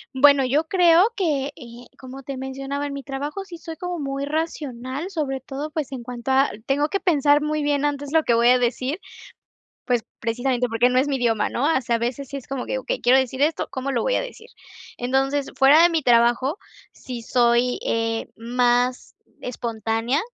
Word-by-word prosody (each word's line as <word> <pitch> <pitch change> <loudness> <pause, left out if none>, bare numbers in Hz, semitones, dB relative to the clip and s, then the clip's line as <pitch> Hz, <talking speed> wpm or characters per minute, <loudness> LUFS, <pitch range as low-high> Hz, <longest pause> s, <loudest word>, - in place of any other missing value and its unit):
Bueno, 280 0 +6
yo 295 +5 +1
creo 350 +1 +5
que, 300 -8 0
eh, 240 -3 -12
como 265 +1 -10
te 270 0 -6
mencionaba 270 +2 -4
en 285 - -4
mi 280 - -5
trabajo, 290 +8 -5
sí 350 -3 -10
soy 325 -1 -9
como 360 -1 -4
muy 275 -2 -3
racional, 290 -1 -4
sobre 290 -7 -2
todo, 285 +3 -6
pues 295 -3 -4
en 255 -3 -6
cuanto 245 0 -6
a 265 +1 +3 0.2
tengo 290 +2 +2
que 395 - -1
pensar 295 -5 +3
muy 300 0 -1
bien 290 -1 +1
antes 285 -1 -2
lo 320 - +5
que 235 - +2
voy 235 +1 +4
a 250 0 +5
decir, 255 +7 -1 0.9
pues 245 -3 +1
precisamente 245 +2 -1
porque 235 +2 +2
no 255 - +2
es 280 +3 +2
mi 275 - 0
idioma, 225 -4 +1
¿no?, 255 - -2
o 305 -4 +3
sea, 235 -1 0
a - - -4
veces 245 +3 -3
si 280 - -6
es 270 - -8
como 270 -2 -4
que - - -2
okey, 260 - -3
quiero 255 +2 +5
decir 260 0 -2
esto, 310 +3 +1
¿cómo 270 +1 -3
lo 245 - 0
voy - - +1
a - - +1
decir? 480 -1 -9 0.5
Entonces, 270 +3 0
fuera 285 +4 +7
de 345 - +7
mi 330 -3 0
trabajo, 240 - +3 0.3
sí 245 -3 -8
soy, 240 +1 +2
eh, 225 0 -1
más 245 +2 0 0.3
espontánea, 230 +2 -2
270 Hz, 200 wpm, -23 LUFS, 245-295 Hz, 0.9 s, fuera